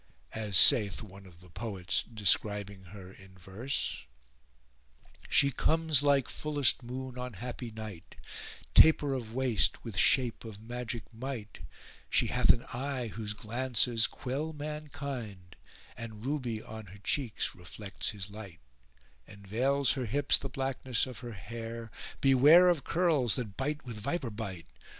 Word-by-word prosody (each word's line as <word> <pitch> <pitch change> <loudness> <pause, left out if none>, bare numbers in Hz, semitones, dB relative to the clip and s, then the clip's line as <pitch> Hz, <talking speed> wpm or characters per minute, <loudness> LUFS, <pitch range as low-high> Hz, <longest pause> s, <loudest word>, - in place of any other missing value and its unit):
As 105 -4 +2
saith 105 +2 +7
one 100 -1 -13
of 85 -1 -17
the 90 - -16
poets 100 -3 -2
describing 100 -2 +1
her 95 0 -11
in 95 -1 -17
verse:— 100 - -4 1.2
She 140 - +5
comes 160 -1 +2
like 140 -3 +3
fullest 145 -4 +1
moon 125 +1 -6
on 125 -1 -5
happy 120 +3 -6
night; 110 -5 -9 0.3
* - - -13
Taper 150 -3 +6
of 115 -3 -5
waist, 130 -5 +2
with 115 -5 -7
shape 125 +2 +3
of 110 -3 -9
magic 120 0 -6
might: 115 -2 -6 0.5
She - - +3
hath - - +2
an 120 - +5
eye 130 -1 -3
whose 105 -1 -5
glances 115 +1 +1
quell 145 +5 -4
mankind, 140 - -6 0.2
* - - -22
And 110 -1 -8
Ruby 125 -6 -2
on 110 -1 -9
her 95 +3 -12
cheeks 115 +3 -1
reflects 95 +3 -5
his 100 -1 -6
light: 100 -5 -10 0.7
Enveils 120 +7 0
her 130 -3 -3
hips 145 +6 +3
the 135 - -5
blackness 130 -2 -1
of 130 -3 -9
her 120 -2 -7
hair; 115 +2 -7 0.3
*Beware 145 +7 +7
of 170 -5 +1
curls 160 - +2
that 110 -6 -5
bite 145 +3 -3
with 115 -4 -7
viper 125 +2 -2
bite! 100 -6 -6
115 Hz, 145 wpm, -31 LUFS, 105-135 Hz, 1.2 s, saith